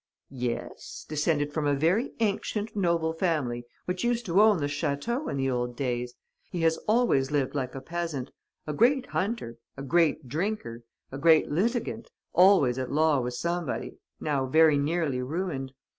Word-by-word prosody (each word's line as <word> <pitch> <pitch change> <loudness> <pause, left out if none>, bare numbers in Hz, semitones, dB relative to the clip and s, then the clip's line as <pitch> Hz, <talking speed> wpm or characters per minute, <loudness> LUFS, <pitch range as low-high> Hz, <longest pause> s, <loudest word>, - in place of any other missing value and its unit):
"'Yes, 125 -3 -5
descended 150 -1 0
from 150 -1 0
a 145 - +3
very 175 - +1
ancient, 215 0 -1
noble 170 -4 +1
family 145 -9 -1 0.2
which 180 0 -3
used 240 0 0
to 185 +3 +4
own 215 -2 +6
the 145 - -1
château 145 - -2
in - - -3
the 135 0 0
old 120 -1 -2
days. 125 -2 -2 0.3
He 175 - -3
has 160 0 +3
always 215 - +3
lived 145 -3 0
like 130 -3 -3
a 135 - -5
peasant: 165 -3 -4 0.3
a 150 - -3
great 250 - +3
hunter, 195 - -2 0.2
a 135 - -6
great 160 -1 +2
drinker, 155 - -3 0.3
a 135 - -6
great 160 -1 +4
litigant, 230 - -1 0.2
always 175 -10 +5
at 130 - -3
law 155 -1 +3
with 125 0 -3
somebody, 170 -1 -3 0.2
now 140 -3 -1
very 155 +1 +5
nearly 145 -3 0
ruined. 140 -1 -3
155 Hz, 160 wpm, -27 LUFS, 135-185 Hz, 0.3 s, own